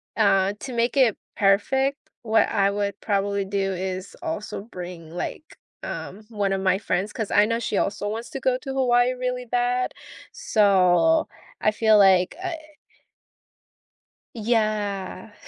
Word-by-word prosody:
uh, 195 -2 +3
to 260 - -6
make 235 +2 0
it 250 -6 +4 0.2
perfect, 265 +8 +2 0.3
what 225 -1 +3
I 200 -2 +2
would 200 0 -2
probably 200 -1 0
do 195 0 -1
is 185 +1 -5
also 320 - -4
bring, 180 -6 -9
like, 175 - -5 0.4
um, 205 +3 -6
1 205 -3 -1
of 195 - 0
my 190 0 +2
friends, 200 0 -2
'cause 220 -4 -3
I 205 - +4
know 230 +1 -1
she 210 -3 -2
also 205 0 -1
wants 225 +3 -5
to 270 - -5
go 260 -1 +1
to 270 0 -6
Hawaii 250 -1 +3
really 250 0 -3
bad, 245 +1 0 0.4
so 185 - +3 0.3
I - - +4
feel 215 0 +4
like, 190 -2 +5
eh 365 -2 -3 1.8
Yeah. 215 -3 -1
210 Hz, 145 wpm, -24 LUFS, 195-245 Hz, 1.8 s, like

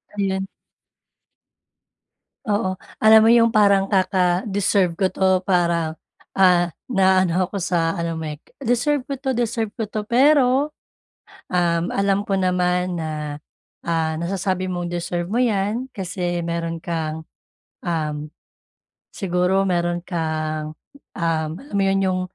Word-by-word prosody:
Di 200 - -1
'yan. 190 0 -2 2.0
Oo. 205 -3 0 0.2
Alam 220 0 +8
mo 225 - +6
'yong 230 -1 +5
parang 200 -3 +3
kaka-deserve 190 0 +1
ko 190 +3 0
'to 190 0 +1
para, 170 -4 0 0.4
ah, 180 -2 +5 0.2
naa-ano 190 -4 +2
ko 200 - -4
sa 170 -3 0
ano 170 0 -2
mo, 160 -1 -4
eh, 150 - -6 0.2
"Deserve 255 +4 +1
ko 280 - -3
'to, 265 0 -4
deserve 225 -2 -1
ko 225 - -4
'to," 210 -1 -4
pero, 270 +2 +4 0.8
um, 170 -2 +1
alam 200 0 +1
ko 195 -2 -1
naman 180 -1 +1
na, 160 -1 -3 0.7
ah, 160 -1 0
nasasabi 185 +2 -2
mong 175 -1 -3
deserve 175 0 -2
mo 235 +5 +1
'yan 225 +3 -1
kasi 180 -4 -3
meron 165 0 -3
kang, 160 -1 -4 0.6
um, 155 -3 -3 0.8
siguro 190 +1 0
meron 175 -1 0
kang, 155 -3 -3 0.4
um, 165 -3 -1
alam 280 -6 -9
mo - - +2
'yon, 195 0 +2
'yong, 185 -1 0
185 Hz, 130 wpm, -22 LUFS, 170-205 Hz, 2.0 s, Alam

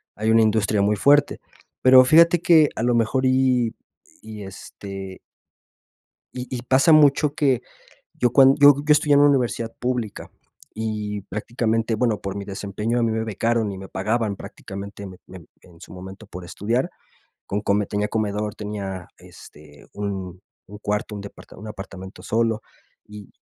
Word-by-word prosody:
hay 110 +1 -1
una 115 - +5
industria 110 -1 +2
muy 105 +1 +2
fuerte, 145 +7 +3 0.4
pero 130 0 +8
fíjate 165 +4 +5
que 160 -3 +5
a 115 - -3
lo 120 -1 +2
mejor, 120 +3 +1
y 130 -3 +2 0.5
y 110 -2 -9
este 95 0 -9 1.1
Y 125 0 -6
y 120 - -5
pasa 135 +5 +3
mucho 150 -1 +5
que, 130 -5 +1 0.5
yo 125 - 0
cuan 135 -1 +6
yo 145 0 +9
yo 155 - +2
estudié 150 0 +4
en 145 - +6
una 145 - +6
universidad 120 -4 -1
pública, 125 -4 -3 0.4
y 105 -2 -4
prácticamente, 115 +2 -2
bueno, 110 -3 0
por 100 0 -5
mi 100 -1 -5
desempeño 105 +4 -3
a - - +1
mí 115 - +1
me 110 0 -1
becaron 110 0 -1
y 95 - -7
me 95 0 -10
pagaban 105 +1 -1
prácticamente 100 +2 -9
me 95 - -12
me 90 -3 -12 0.2
en 85 -2 -19
su - - -12
momento 95 +3 -11
por 90 -2 -9
estudiar. 115 - -2 0.6
Con 100 +1 -3
come 100 0 +1
tenía 105 0 -1
comedor, 105 -1 -2
tenía, 100 -4 -6
este, 75 -1 -16
un 95 -3 -5 0.3
un 105 - -11
cuarto, 105 +1 -3
un 100 - -6
depart 100 - -12
un 110 - -11
apartamento 95 -2 -9
solo. 115 -1 0 0.4
Y 105 -1 -12
110 Hz, 165 wpm, -22 LUFS, 100-125 Hz, 1.1 s, yo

